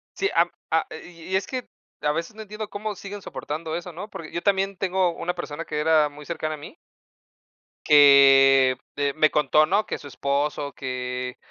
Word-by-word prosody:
Sí. 400 - 0
Am - - +4 0.2
a - - +1 0.2
y 170 -2 -14
y - - +3
es 190 0 0
que 255 -2 -5 0.3
a 150 - +1
veces 170 +7 -4
no 220 - -9
entiendo 210 +1 -7
cómo 210 +1 -5
siguen 200 +1 -8
soportando 155 +2 -5
eso, 175 +1 -6
¿no? 200 +6 -8
Por 160 -5 -9
yo 170 - -4
también 195 -1 +1
tengo 185 -1 +1
una 180 - -3
persona 165 -2 -6
que 150 -1 -3
era 155 -1 +4
muy 145 +1 -13
cercana 155 -1 -3
a - - -12
mí 145 - -11 1.1
que 135 -2 +7 0.2
de 140 -1 0
me 155 +1 +3
contó, 150 +1 +3
¿no? 200 +7 +1
Que - - -4
su 145 - -11
esposo, 140 +1 -2
que 125 -1 -5
155 Hz, 195 wpm, -24 LUFS, 145-190 Hz, 1.1 s, que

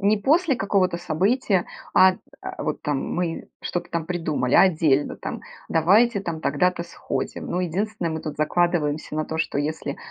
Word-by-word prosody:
не 205 +2 +3
после 300 - +3
какого-то 195 -4 +1
события, 185 - +1 0.3
а 185 0 +7
д - - -12 0.2
а - - -6
вот - - -3
там 145 -2 0 0.2
мы 175 -2 -2
что-то 175 - -4
там 165 -1 -2
придумали, 160 -7 -1
а - - +8
отдельно 155 -6 +2
там: - - -6 0.3
"Давайте 200 +7 +4
там 165 -4 -4
тогда-то 170 +4 +1
сходим". 170 - -4
Ну, 180 - -1
единственное, 185 0 -2
мы 160 - -3
тут 155 - -6
закладываемся 155 -1 0
на 155 - 0
то, 160 - -5
что 160 -3 -1
если: 145 -1 -3
175 Hz, 170 wpm, -24 LUFS, 155-195 Hz, 0.3 s, а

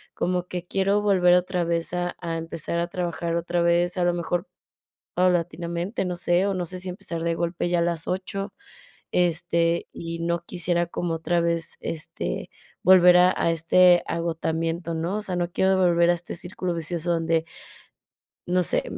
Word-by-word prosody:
como 180 0 -1
que 180 -1 -5
quiero 195 +2 +1
volver 185 -3 +4
otra 180 0 +1
vez 170 +1 -1
a 175 0 -2
a 165 -1 -3
empezar 165 0 -4
a 170 - 0
trabajar 170 -1 -3
otra 170 +1 0
vez, 175 +1 +2
a 180 - +1
lo 175 - +2
mejor 175 +2 -2 0.7
paulatinamente, 175 +1 0
no 180 -1 -2
sé, 175 +2 +1
o 200 - 0
no 180 -1 -2
sé 185 +2 -7
si 185 0 -6
empezar 170 -2 -5
de 170 0 0
golpe 170 +1 -2
ya 175 0 +2
a - - +1
las 170 -2 -2
8. 195 +2 -3 0.6
Este, 170 -1 +1
y 165 0 -6
no 170 0 -1
quisiera 175 -1 -1
como 170 0 -3
otra 170 +1 0
vez, 170 -1 -1
este, 160 -1 -4 0.3
volver 180 -1 +7
a 180 +1 +6
a 165 - +2
este 175 +2 +5
agotamiento, 165 0 -2
¿no? 165 +5 -2
O - - -4
sea, 185 -3 -2
no 175 0 -1
quiero 190 0 +2
volver 170 -1 +4
a 175 - +4
este 175 0 -6
círculo 180 0 -4
vicioso 170 +1 -2
donde 165 -1 +1 1.0
no 180 +1 +2
sé, - - +1
175 Hz, 175 wpm, -25 LUFS, 170-180 Hz, 1.0 s, volver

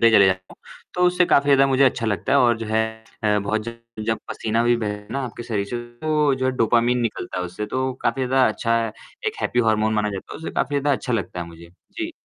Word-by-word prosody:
पे 115 0 +6
चले 100 - +7
जाता 95 0 0
हूँ, - - -16 0.4
तो - - -3
उससे 180 0 +3
काफ़ी 140 - +4
ज़्यादा 135 -1 +6
मुझे 135 0 +4
अच्छा 125 -3 +1
लगता 105 +6 -1
है 140 - +6
और 120 -3 +4
जो 115 - -5
है 110 +1 +2 0.4
अ, 105 0 +3
बहुत 105 +2 -1
जब 115 0 -6 0.3
जब 110 0 +1
पसीना 115 +1 -1
भी 120 0 +4
बहे 105 -2 -4
ना 135 +3 -2
आपके 120 -1 -7
शरीर 105 -4 -2
से, 120 - -4 0.2
तो 150 -3 +2
जो 130 - -3
है - - +3
डोपामाइन 120 +2 +3
निकलता 105 -5 -3
है 90 - -2
उससे 90 +4 -5
तो 130 +4 -1
काफ़ी 125 +2 0
ज़्यादा 130 0 +4
अच्छा 115 +1 0
है, 110 - -4 0.3
एक 440 - -1
हैप्पी 120 - -1
हॉर्मोन 110 0 +2
माना 105 -1 +1
जाता 95 -1 -7
है, - - -6
उससे 160 - -5
काफ़ी 145 - 0
ज़्यादा 145 0 +2
अच्छा 125 - -4
लगता 100 -5 -2
है 85 - -4
मुझे। 85 0 -13 0.2
जी। 330 -1 -4
115 Hz, 255 wpm, -22 LUFS, 105-130 Hz, 0.4 s, चले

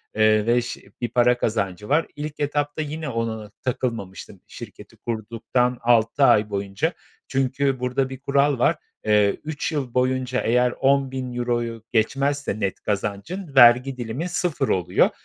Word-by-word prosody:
eee, 110 -1 +4
ve 120 +1 +3
iş 120 0 -2 0.2
bir 120 - -1
para 125 0 +3
kazancı 105 -3 -2
var. 155 +4 +2
İlk 150 0 -6
etapta 145 +1 -1
yine 155 0 -4
ona 115 -3 -3
takılmamıştım 110 -7 -4
şirketi - - -11
kurduktan 120 +2 -1
6 120 +3 +3
ay 105 -4 +5
boyunca. 100 - -2 0.3
Çünkü 135 0 0
burada 125 +1 -1
bir 130 -1 -8
kural 140 -1 +1
var: 150 +7 +3 0.3
Eee, 105 -1 +3
3 155 +1 -3
yıl 135 -6 -3
boyunca 130 0 0
eğer 125 +2 +2
€10.000'yu 125 -4 -1
geçmezse 135 +1 0
net 100 -3 -2
kazancın, 105 - -4
vergi 125 +1 +6
dilimi 125 +8 -4
0 170 -5 -1
oluyor. 90 -1 +2
125 Hz, 140 wpm, -23 LUFS, 110-140 Hz, 0.3 s, vergi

